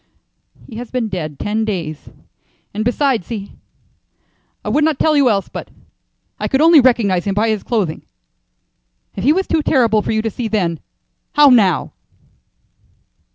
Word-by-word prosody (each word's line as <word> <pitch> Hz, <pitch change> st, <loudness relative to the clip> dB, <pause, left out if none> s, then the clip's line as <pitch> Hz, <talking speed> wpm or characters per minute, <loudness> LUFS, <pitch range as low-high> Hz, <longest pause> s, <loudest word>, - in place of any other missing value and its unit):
"He 225 Hz, -, -10 dB
has 240 Hz, -1 st, -7 dB
been 245 Hz, -4 st, -2 dB
dead 155 Hz, -7 st, -5 dB
ten 215 Hz, +2 st, -2 dB
days, 170 Hz, -8 st, -4 dB, 0.6 s
and 215 Hz, +2 st, -2 dB
besides 245 Hz, -, 0 dB
he 210 Hz, -4 st, -6 dB, 1.1 s
I -, -, -2 dB
would 290 Hz, +8 st, +2 dB
not 310 Hz, -2 st, +1 dB
tell 310 Hz, +1 st, +2 dB
you 280 Hz, -3 st, +4 dB
else, 200 Hz, -3 st, 0 dB
but -, -, -8 dB, 0.7 s
I -, -, -2 dB
could 265 Hz, -, 0 dB
only 320 Hz, -1 st, +7 dB
recognize 220 Hz, -8 st, +2 dB
him 195 Hz, -1 st, -1 dB
by 220 Hz, +2 st, +1 dB
his 215 Hz, -2 st, -1 dB
clothing. 205 Hz, -10 st, -2 dB, 1.1 s
If 190 Hz, -, -5 dB
he 275 Hz, -, +4 dB
was 380 Hz, +4 st, +1 dB
too 320 Hz, -, 0 dB
terrible 230 Hz, -8 st, +2 dB
for -, -, -3 dB
you 220 Hz, 0 st, 0 dB
to 225 Hz, -, -2 dB
see 235 Hz, +3 st, -4 dB
then, 180 Hz, -7 st, -1 dB, 0.5 s
how 295 Hz, -1 st, +6 dB
now?" 195 Hz, -9 st, +3 dB
220 Hz, 160 wpm, -17 LUFS, 200-260 Hz, 1.1 s, only